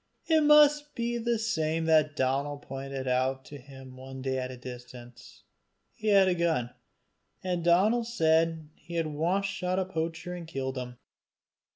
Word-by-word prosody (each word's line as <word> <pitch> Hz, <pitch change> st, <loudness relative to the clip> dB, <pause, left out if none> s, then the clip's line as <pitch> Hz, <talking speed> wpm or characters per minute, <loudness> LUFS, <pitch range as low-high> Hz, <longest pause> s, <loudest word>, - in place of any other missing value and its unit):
It 320 Hz, -1 st, +3 dB
must 295 Hz, 0 st, +5 dB
be 235 Hz, 0 st, -2 dB
the 235 Hz, 0 st, 0 dB
same 165 Hz, -8 st, -1 dB
that 155 Hz, -1 st, +3 dB
Donal 140 Hz, +2 st, 0 dB
pointed 135 Hz, -1 st, -6 dB
out 130 Hz, +1 st, 0 dB
to 145 Hz, -, -10 dB
him 135 Hz, -1 st, -13 dB
one 130 Hz, 0 st, -9 dB
day 130 Hz, -1 st, -1 dB
at 130 Hz, 0 st, -4 dB
a 130 Hz, -, -8 dB
distance; 125 Hz, -1 st, -11 dB, 0.5 s
he 220 Hz, -, -7 dB
had 200 Hz, -2 st, +5 dB
a 185 Hz, -, +3 dB
gun, 165 Hz, -8 st, 0 dB, 0.7 s
and 180 Hz, -2 st, -2 dB
Donal 200 Hz, +8 st, +3 dB
said 165 Hz, -7 st, +1 dB
he 170 Hz, +2 st, -11 dB
had 165 Hz, -1 st, 0 dB
once 165 Hz, +6 st, 0 dB
shot 185 Hz, -2 st, -2 dB
a 190 Hz, -, 0 dB
poacher 165 Hz, 0 st, -4 dB
and 175 Hz, -2 st, -7 dB
killed 135 Hz, -4 st, -4 dB
him. 125 Hz, -1 st, -6 dB
160 Hz, 165 wpm, -28 LUFS, 130-190 Hz, 0.7 s, must